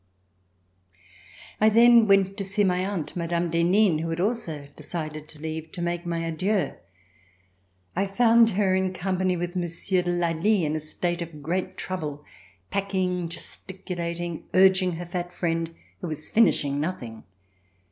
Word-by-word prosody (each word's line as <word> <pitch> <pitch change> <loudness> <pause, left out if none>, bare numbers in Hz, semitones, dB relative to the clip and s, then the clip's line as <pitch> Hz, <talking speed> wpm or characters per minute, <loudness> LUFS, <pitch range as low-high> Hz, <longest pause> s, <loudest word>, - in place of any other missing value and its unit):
I 215 - +6
then 235 0 +7
went 195 -1 +4
to 200 - -2
see 195 +2 +1
my 180 -1 +2
aunt, 190 -5 -3
Madame 170 0 -1
d'Henin, 175 +1 +3
who 165 +1 -3
had 165 +1 -3
also 180 -9 -2
decided 155 -3 -6
to 155 - -13
leave, 160 0 -5
to 180 - -5
make 175 0 -2
my 170 -1 -1
adieux. 180 0 0 1.2
I 200 - +1
found 230 +3 +5
her 195 -3 +3
in 190 0 +1
company 185 0 0
with 175 +1 -4
Monsieur 180 +2 0
de 175 - -3
Lally 175 +2 +1
in 150 +1 -1
a 155 - -2
state 175 +3 -3
of 160 -3 -7
great 180 +5 -2
trouble, 150 -6 -5 0.5
packing, 185 -3 -1
gesticulating, 175 -1 -5
urging 185 -1 +5
her 175 +2 -5
fat 175 0 -4
friend 165 -2 -1 0.3
who 180 - -5
was 155 -1 -4
finishing 145 -10 +3
nothing. 125 -9 -4
175 Hz, 145 wpm, -26 LUFS, 165-190 Hz, 1.2 s, then